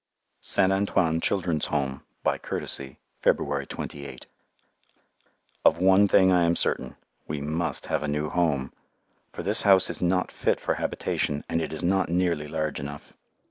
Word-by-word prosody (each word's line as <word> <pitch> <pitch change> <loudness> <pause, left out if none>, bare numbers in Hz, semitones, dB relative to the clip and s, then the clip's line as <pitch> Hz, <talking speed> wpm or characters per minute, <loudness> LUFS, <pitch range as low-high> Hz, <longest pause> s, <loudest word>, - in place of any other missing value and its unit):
St. 95 -1 +3
Antoine 90 -4 +1
Children's 90 -6 0
Home 70 -2 -2 0.2
(by - - +1
courtesy) 65 -1 -4 0.2
February - - +1
28 70 -1 -7 1.4
Of - - +5
one 95 +3 +5
thing 95 -1 +5
I 90 -1 +4
am 85 0 +2
certain, 65 -5 0 0.3
we 75 -1 -3
must 80 +4 -1
have - - -1
a 75 - -3
new 75 +1 -1
Home, 75 -6 0 0.6
for - - -7
this 100 +5 +2
house 95 -2 +5
is - - -6
not 90 +1 +1
fit - - 0
for - - -1
habitation, 75 0 -2
and 85 - -1
it 80 - -4
is 80 +2 -5
not 95 0 +1
nearly 85 -4 0
large 75 -1 -3
enough. 70 +1 -8
85 Hz, 155 wpm, -26 LUFS, 75-95 Hz, 1.4 s, Of